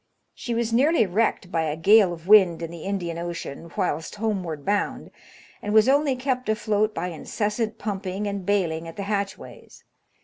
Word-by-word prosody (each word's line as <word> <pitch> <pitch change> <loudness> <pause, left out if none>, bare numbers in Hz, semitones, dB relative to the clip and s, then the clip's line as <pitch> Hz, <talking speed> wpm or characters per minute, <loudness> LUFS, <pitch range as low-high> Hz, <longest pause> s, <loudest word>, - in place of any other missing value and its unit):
She 235 - -4
was 230 0 -1
nearly 275 +1 +4
wrecked 190 -1 0
by 165 - +1
a 155 -1 -2
gale 200 +3 +5
of 170 0 -9
wind 190 -5 +6
in 165 - -5
the 170 -2 -9
Indian 175 -4 -3
Ocean 170 -2 -6
whilst 160 0 -2
homeward 190 -9 -3
bound, 205 0 -1 0.5
and 210 +1 -2
was 220 +1 +6
only 280 0 +3
kept 255 -2 -2
afloat 215 0 0
by 180 +2 -2
incessant 210 +6 -3
pumping 200 -1 -4
and 200 -1 -3
baling 170 -5 0
at 165 - -9
the 200 - -4
hatchways. 200 -1 -5
200 Hz, 170 wpm, -24 LUFS, 170-220 Hz, 0.5 s, wind